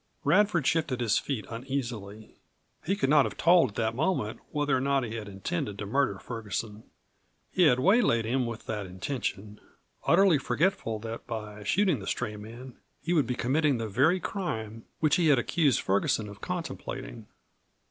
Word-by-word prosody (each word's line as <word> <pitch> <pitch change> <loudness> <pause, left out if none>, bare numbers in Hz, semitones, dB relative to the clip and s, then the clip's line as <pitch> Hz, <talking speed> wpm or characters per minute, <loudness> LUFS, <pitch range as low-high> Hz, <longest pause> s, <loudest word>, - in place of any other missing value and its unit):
Radford 170 0 +3
shifted 150 -5 +1
his 115 -4 +2
feet 130 -7 -4
uneasily. 115 -4 -5 0.5
He 195 +5 0
could 140 -9 0
not 150 -2 +6
have - - -5
told 170 -5 +5
at 100 - -16
that 110 +1 0
moment 130 - -1
whether 145 -2 0
or 130 - 0
not 140 0 +1
he 115 -2 -5
had 110 -3 -5
intended 95 0 -3
to 100 - -5
murder 125 -2 +1
Ferguson. 110 -1 -5 0.7
He 180 -3 +4
had 125 -3 +4
waylaid 175 - +3
him 125 +2 0
with 115 -1 -7
that 105 -3 -4
intention, 105 +1 -4 0.5
utterly 175 -3 +5
forgetful 145 - 0
that 115 +1 -7
by 105 -3 -6
shooting 180 - +2
the 95 - -8
stray 105 - -2
man 115 +4 -10 0.3
he 170 +4 0
would 155 -5 +3
be 125 - -1
committing 140 +3 +1
the 115 -1 -3
very 140 - +3
crime 115 - -4 0.2
which 155 -2 +3
he 170 -3 +3
had 145 -3 +5
accused 140 +3 +2
Ferguson 100 +2 +1
of 100 0 -11
contemplating. 170 - -5
125 Hz, 170 wpm, -28 LUFS, 110-155 Hz, 0.7 s, not